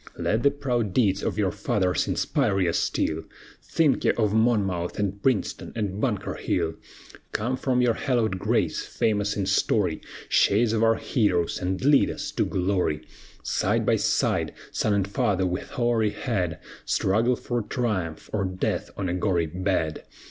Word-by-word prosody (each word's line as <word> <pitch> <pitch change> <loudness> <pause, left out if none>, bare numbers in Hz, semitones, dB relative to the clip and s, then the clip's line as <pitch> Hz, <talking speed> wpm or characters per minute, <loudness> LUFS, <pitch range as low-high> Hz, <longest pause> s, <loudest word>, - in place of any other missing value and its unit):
Let 110 +2 0
the 140 - +5
proud 125 -8 -2
deeds 100 -5 +3
of - - -2
your 100 -3 +1
fathers 95 -2 0
inspire 110 -9 +1
ye 90 -3 +2
still, 80 -1 0 0.4
Think 155 -4 +1
ye - - +3
of 105 -3 0
Monmouth, 100 -6 +1
and 100 -1 -2
Princeton, 125 -6 0
and 105 -2 -2
Bunker 105 -7 -1
Hill, 80 - -1 0.6
Come 120 +5 0
from 125 -1 +1
your 120 -2 +3
hallowed 110 -7 0
graves, - - 0
famous 105 -2 0
in 100 - 0
story, 95 -2 +1 0.3
Shades 110 +2 +3
of 110 - +1
our 115 0 +4
heroes, 100 - 0
and 95 +5 -2
lead 145 -1 +5
us - - -4
to - - 0
glory. 90 -5 0 0.4
Side - - 0
by - - +3
side, - - 0 0.2
son 105 -2 +1
and 100 -1 +1
father 95 -1 +1
with 90 +1 -3
hoary 120 -3 +1
head 105 -5 -2 0.3
Struggle 115 +6 +2
for 120 0 -2
triumph, 105 - -2
or 105 -2 +1
death 95 -1 -2
on 95 - -2
a 85 - -1
gory 90 -2 +1
bed. 90 -1 -1
105 Hz, 160 wpm, -25 LUFS, 95-115 Hz, 0.6 s, the